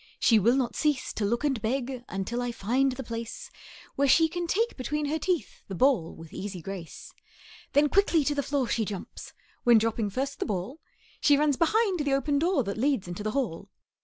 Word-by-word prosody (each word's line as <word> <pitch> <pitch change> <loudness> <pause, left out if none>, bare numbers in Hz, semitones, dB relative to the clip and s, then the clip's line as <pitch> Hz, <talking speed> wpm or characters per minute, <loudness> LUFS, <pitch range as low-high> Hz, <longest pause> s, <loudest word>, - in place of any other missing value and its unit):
She 225 -3 +5
will 235 +6 +4
not 260 -3 -1
cease 295 -4 0
to 210 - -1
look 235 +6 0
and 270 -6 0
beg, 250 +2 -2
Until 195 +6 -3
I 245 0 -2
find 250 +5 +1
the 265 +1 -6
place 230 -1 -6 0.4
Where 280 - +2
she 325 +4 +5
can 345 +1 -4
take 450 +7 0
between 295 +4 -2
her 310 +2 -1
teeth 345 - -2
The 195 - -5
ball 245 -7 +2
with 165 -1 -12
easy 195 -2 -5
grace. 180 -1 -8 0.6
Then 290 +1 +5
quickly 350 -2 +3
to 290 - +1
the 285 - 0
floor 280 -2 -1
she 230 - 0
jumps; 205 -2 -7 0.3
When, 240 -1 +6
dropping 225 -1 0
first 270 +7 -3
the - - -1
ball, 210 - -4 0.4
She 290 -2 +5
runs 295 -1 +2
behind 385 - +2
the 285 -2 +1
open 280 +1 +1
door 335 -3 +2
That 200 +1 -4
leads 265 -7 +1
into 175 +3 -6
the 215 - -2
hall. 255 -12 -2
260 Hz, 205 wpm, -27 LUFS, 220-290 Hz, 0.6 s, When